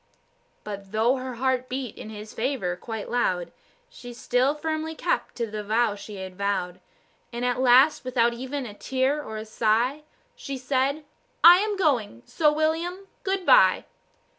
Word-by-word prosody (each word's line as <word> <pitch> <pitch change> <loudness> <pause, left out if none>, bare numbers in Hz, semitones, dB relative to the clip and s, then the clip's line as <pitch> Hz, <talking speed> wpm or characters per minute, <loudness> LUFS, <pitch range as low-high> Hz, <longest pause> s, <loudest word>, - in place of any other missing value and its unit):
But 200 -2 -8
though 230 +5 +2
her 255 -1 -6
heart 255 +1 -1
beat 255 -3 -4
in - - -9
his 215 0 -9
favour 225 -8 -2
quite 220 +2 -6
loud, 185 -8 -1 0.4
She 245 - -11
still 255 +4 +1
firmly 315 +1 -3
kept - - -2
to 235 - -2
the 215 -1 -6
vow 220 +1 +1
she 205 +1 -9
had 190 -1 -8
vowed; 185 -2 -2 0.5
And 240 +1 -3
at 250 0 0
last, 260 +4 +5
without 240 -2 +1
even 260 +3 -5
a 210 - -8
tear 265 +6 -1
or 220 -2 -6
sigh, 230 +6 +1 0.3
She 275 -1 -6
said, 270 +3 -1 0.4
"I 350 +1 +10
am 415 0 -1
going, 240 - 0
so, 305 -2 +2
William, 330 +5 -1
goodbye." 390 +5 +4
250 Hz, 155 wpm, -25 LUFS, 215-295 Hz, 0.5 s, I